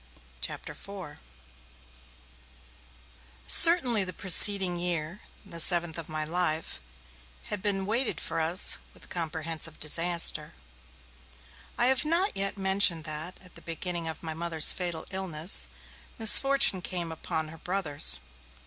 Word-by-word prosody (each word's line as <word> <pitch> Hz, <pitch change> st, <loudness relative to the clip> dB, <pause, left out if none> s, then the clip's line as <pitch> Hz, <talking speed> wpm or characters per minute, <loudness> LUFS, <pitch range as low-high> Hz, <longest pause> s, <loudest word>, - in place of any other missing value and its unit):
CHAPTER -, -, -7 dB
IV 190 Hz, -7 st, -12 dB, 2.3 s
CERTAINLY 255 Hz, -, +5 dB
the 185 Hz, -, -5 dB
preceding 190 Hz, -1 st, +5 dB
year, 175 Hz, +1 st, -4 dB, 0.2 s
the 170 Hz, -, -7 dB
seventh 170 Hz, -1 st, +4 dB
of 165 Hz, -, -8 dB
my 155 Hz, 0 st, -4 dB
life, 165 Hz, -1 st, -4 dB, 0.7 s
had 205 Hz, -, -3 dB
been 195 Hz, -1 st, -3 dB
weighted 230 Hz, +4 st, -2 dB
for -, -, -6 dB
us 165 Hz, +3 st, +2 dB, 0.2 s
with -, -, -19 dB
comprehensive 160 Hz, -1 st, -6 dB
disaster. 170 Hz, +3 st, 0 dB, 1.2 s
I 240 Hz, -, +2 dB
have 260 Hz, +1 st, +2 dB
not 340 Hz, +6 st, -2 dB
yet 195 Hz, +1 st, -2 dB
mentioned 190 Hz, -4 st, 0 dB
that, 155 Hz, +3 st, -7 dB
at 180 Hz, -, -16 dB
the -, -, -14 dB
beginning 170 Hz, 0 st, -7 dB
of 160 Hz, 0 st, -8 dB
my 160 Hz, -1 st, -7 dB
Mother's 165 Hz, -1 st, +4 dB
fatal 175 Hz, -3 st, -5 dB
illness, 185 Hz, -2 st, -1 dB, 0.5 s
misfortune 235 Hz, -3 st, +4 dB
came 175 Hz, -2 st, -5 dB
upon 160 Hz, 0 st, -6 dB
her 165 Hz, 0 st, -15 dB
brothers. 145 Hz, -, +1 dB
175 Hz, 120 wpm, -25 LUFS, 160-195 Hz, 2.3 s, CERTAINLY